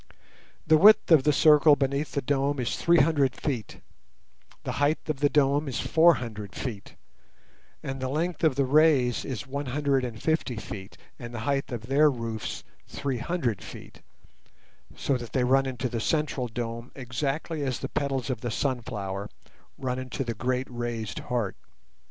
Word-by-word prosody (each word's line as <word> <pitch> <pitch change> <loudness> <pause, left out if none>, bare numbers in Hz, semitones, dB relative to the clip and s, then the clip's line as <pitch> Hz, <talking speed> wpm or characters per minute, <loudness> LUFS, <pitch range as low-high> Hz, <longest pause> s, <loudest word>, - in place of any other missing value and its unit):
The 155 0 +5
width 210 -1 +7
of 150 -5 +6
the 150 - +5
circle 150 0 +6
beneath 140 +1 -1
the 140 - -1
dome 140 +1 0
is 125 - -1
three 170 0 +3
hundred 140 -4 +2
feet, 125 -9 -4 0.8
the - - -3
height 145 +2 +3
of 155 -4 -2
the 145 0 +3
dome 145 +1 +2
is 130 - -3
four 165 +1 +5
hundred 105 -6 -7
feet, 110 -7 -6 0.9
and 135 0 -4
the 130 - -2
length 165 +4 -2
of 155 -5 +3
the 140 0 +2
rays 140 -4 +3
is 130 -3 -5
one 140 +1 -4
hundred 140 0 +1
and 115 -3 -5
fifty 160 -4 0
feet, 105 -1 -8 0.2
and 120 -1 -8
the 110 - -4
height 135 +3 -1
of 115 -2 -5
their 145 +4 +4
roofs 115 -4 -4 0.2
three 135 -3 -3
hundred 130 - -2
feet, - - -11 1.0
so 140 - 0
that 120 -2 -9
they 130 - +2
run 135 +2 +3
into 130 -1 -3
the 115 -2 -3
central 150 -3 0
dome 115 +1 -5
exactly 140 +5 -3
as 130 -3 -1
the - - -4
petals 135 -4 -2
of 120 -3 -4
the 120 - -3
sunflower 105 -6 -3 0.5
run 130 -1 -2
into 130 +1 -4
the 120 -2 -3
great 125 +3 -1
raised 120 -3 -4
heart. 120 -6 -2
130 Hz, 170 wpm, -27 LUFS, 120-145 Hz, 1.0 s, width